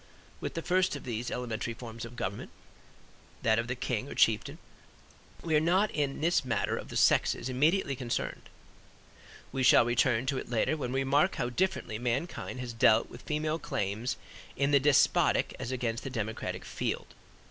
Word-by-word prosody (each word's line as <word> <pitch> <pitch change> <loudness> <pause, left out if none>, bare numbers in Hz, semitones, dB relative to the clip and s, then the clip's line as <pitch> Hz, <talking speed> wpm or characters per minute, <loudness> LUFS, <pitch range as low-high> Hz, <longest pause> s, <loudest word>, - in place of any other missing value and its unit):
With - - -5
the 165 - -3
first 185 -1 +2
of 145 - -7
these 120 -1 -3
elementary 120 -1 -3
forms 115 -1 -7
of 120 +1 -10
government, 100 -3 -4 0.9
that 110 0 +3
of 115 - -2
the 125 - -2
king 120 -3 -2
or - - -7
chieftain, - - +2 0.9
we 160 -2 +1
are - - +6
not 185 +6 +2
in 145 -2 -2
this 170 0 +2
matter 130 - 0
of - - -7
the - - -4
sexes 130 - +3
immediately 145 +3 +2
concerned. 120 -2 -4 1.0
We 135 - -2
shall 125 -2 +6
return 120 0 +2
to 135 -1 0
it - - -8
later 120 +6 +1
when 130 -5 -4
we 135 +1 0
remark 145 +7 +2
how 120 - -2
differently 175 - -1
mankind 125 +3 -3
has 120 -2 -5
dealt 115 -1 +4
with - - -10
female 155 +1 -1
claims 110 -4 -2 0.4
in 140 +1 +2
the 140 - +6
despotic 140 0 +3
as 120 - -4
against 120 -3 -2
the 135 - -4
democratic 110 -3 -4
field. - - -3
130 Hz, 175 wpm, -30 LUFS, 115-150 Hz, 1.0 s, are